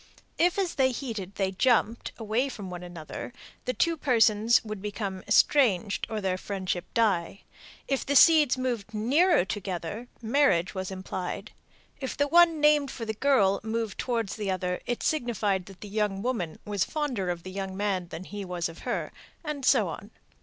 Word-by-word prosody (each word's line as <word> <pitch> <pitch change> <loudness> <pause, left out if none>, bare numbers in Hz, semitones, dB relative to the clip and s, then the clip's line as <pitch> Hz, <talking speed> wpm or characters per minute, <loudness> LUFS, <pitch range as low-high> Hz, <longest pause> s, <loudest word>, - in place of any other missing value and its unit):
If 350 +3 +3
as 380 -3 0
they 260 -1 +3
heated 220 -7 -5
they 190 -1 0
jumped 230 +2 +1
away 225 +4 0
from 200 -7 -7
one 180 -1 -6
another, 175 +3 -7 0.3
the 255 - 0
two 335 0 +2
persons 230 -5 +4
would 215 -2 -6
become 200 -2 -4
estranged 215 -8 +3
or 220 - -2
their 185 -2 -1
friendship 185 -3 -4
die; 200 -5 +1 0.5
if 270 -1 0
the 285 - -1
seeds 300 -3 +6
moved 235 -5 -3
nearer 275 - +3
together, 195 +3 -4
marriage 225 -7 +2
was 190 -1 -4
implied; 185 -1 -5 0.5
if 265 -2 -4
the 285 - +2
one 335 0 +5
named 295 -2 +4
for 230 - -6
the 220 - -2
girl 210 -6 +3
moved 225 -1 -3
towards 230 -5 -2
the 205 -2 -3
other, 180 -1 -2
it 240 - -2
signified 210 - 0
that 195 -2 -13
the 210 - -7
young 205 -1 -1
woman 210 -11 -2
was 205 -4 0
fonder 265 - -2
of 175 -1 -3
the 185 - -7
young 190 0 -5
man 195 -3 -1
than 170 +1 -7
he 205 +1 -6
was 180 -2 -2
of 165 0 -11
her, - - -3 0.3
and 300 -3 -4
so - - +4
on. - - -7
215 Hz, 175 wpm, -27 LUFS, 190-255 Hz, 0.5 s, seeds